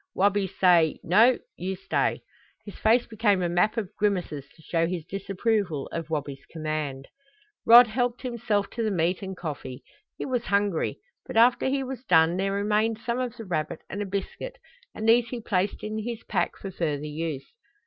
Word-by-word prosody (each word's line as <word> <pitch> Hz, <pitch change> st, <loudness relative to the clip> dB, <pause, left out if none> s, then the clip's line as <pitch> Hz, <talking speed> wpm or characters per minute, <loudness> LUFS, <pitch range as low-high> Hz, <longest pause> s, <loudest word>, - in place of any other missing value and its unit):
Wabi 200 Hz, 0 st, +2 dB
say, 175 Hz, -4 st, +3 dB
'No, 225 Hz, +9 st, +5 dB, 0.2 s
you 190 Hz, +2 st, -3 dB
stay.'" -, -, -1 dB, 0.4 s
His 205 Hz, -, -8 dB
face 235 Hz, +3 st, +4 dB
became 210 Hz, -4 st, +1 dB
a -, -, +1 dB
map 180 Hz, +6 st, +1 dB
of 215 Hz, -2 st, -3 dB
grimaces 180 Hz, -9 st, -1 dB
to 160 Hz, -, -19 dB
show 165 Hz, 0 st, 0 dB
his 170 Hz, -3 st, -4 dB
disapproval 195 Hz, -, -1 dB
of 165 Hz, -1 st, -4 dB
Wabi's 140 Hz, -3 st, -4 dB
command. 155 Hz, -4 st, -4 dB, 0.6 s
Rod 240 Hz, +2 st, +10 dB
helped 245 Hz, +2 st, -1 dB
himself 220 Hz, -5 st, -1 dB
to 235 Hz, -, -4 dB
the 220 Hz, -, +1 dB
meat 175 Hz, -1 st, 0 dB
and 190 Hz, -1 st, -6 dB
coffee. 140 Hz, -6 st, -6 dB, 0.3 s
He -, -, -4 dB
was 250 Hz, -3 st, -1 dB
hungry, 200 Hz, -4 st, 0 dB, 0.3 s
but -, -, -4 dB
after 240 Hz, +3 st, +5 dB
he 270 Hz, +1 st, 0 dB
was 260 Hz, -1 st, -6 dB
done 165 Hz, -4 st, +4 dB
there 195 Hz, +1 st, 0 dB
remained 210 Hz, +2 st, +1 dB
some 235 Hz, +1 st, -1 dB
of 250 Hz, -2 st, -3 dB
the 225 Hz, -, -7 dB
rabbit 155 Hz, -4 st, -3 dB
and 205 Hz, -, -3 dB
a 205 Hz, -, -3 dB
biscuit 200 Hz, -, -5 dB, 0.4 s
and 220 Hz, -, -3 dB
these 235 Hz, +1 st, +5 dB
he 245 Hz, -, -4 dB
placed 200 Hz, -3 st, -1 dB
in 215 Hz, +1 st, -3 dB
his 230 Hz, +1 st, -5 dB
pack -, -, -1 dB
for 195 Hz, -, -7 dB
further 150 Hz, -5 st, -2 dB
use. 150 Hz, -2 st, -4 dB
195 Hz, 180 wpm, -26 LUFS, 165-225 Hz, 0.6 s, Rod